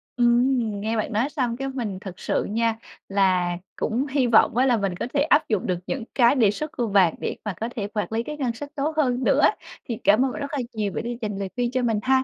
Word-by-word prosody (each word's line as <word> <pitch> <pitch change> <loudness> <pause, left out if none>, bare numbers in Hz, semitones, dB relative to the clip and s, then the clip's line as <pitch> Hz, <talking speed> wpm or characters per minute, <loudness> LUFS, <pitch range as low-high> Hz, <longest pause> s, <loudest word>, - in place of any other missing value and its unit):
Ừm, 245 +2 +3 0.2
nghe 220 +2 -1
bạn 215 - -2
nói 230 +7 +1
xong 250 -6 -2
cái 270 +1 -3
mình 235 -8 -4
thật 190 -3 -9
sự - - 0
nha 225 +1 0 0.3
là 185 -3 +2 0.2
cũng 240 +5 -1
hy 270 -2 +1
vọng 230 0 +4
á 255 - +4
là 250 -3 +3
mình 195 -3 -1
có - - -2
thể 285 - +2
áp 295 -1 +3
dụng 210 -4 0
được 180 -2 0
những 265 -3 -3
cái 240 +1 +5
đề 225 -7 +4
xuất 305 +8 -5
của 240 -3 -2
bạn 195 -5 +4
để - - -3
mà 210 - -2
có 225 - -1
thể 205 -3 -2
quản 210 0 -3
lý 225 +1 -1
cái 300 +3 -6
ngân 255 -5 -1
sách 285 +5 -8
tốt 300 +2 -1
hơn 255 -4 +1
nữa. - - +3 0.4
Thì 230 - -4
cảm 210 +6 +5
ơn 265 - -1
bạn 290 - -6
rất 280 - -4
là 290 - -1
nhiều 210 -2 -2
bởi - - -3
vì 240 0 -4
dành 210 -3 -3
lời 195 -1 -3
khuyên 245 -1 0
cho 255 - 0
mình 225 -3 +1
ha. 260 0 +3
235 Hz, 270 wpm, -24 LUFS, 210-265 Hz, 0.4 s, cái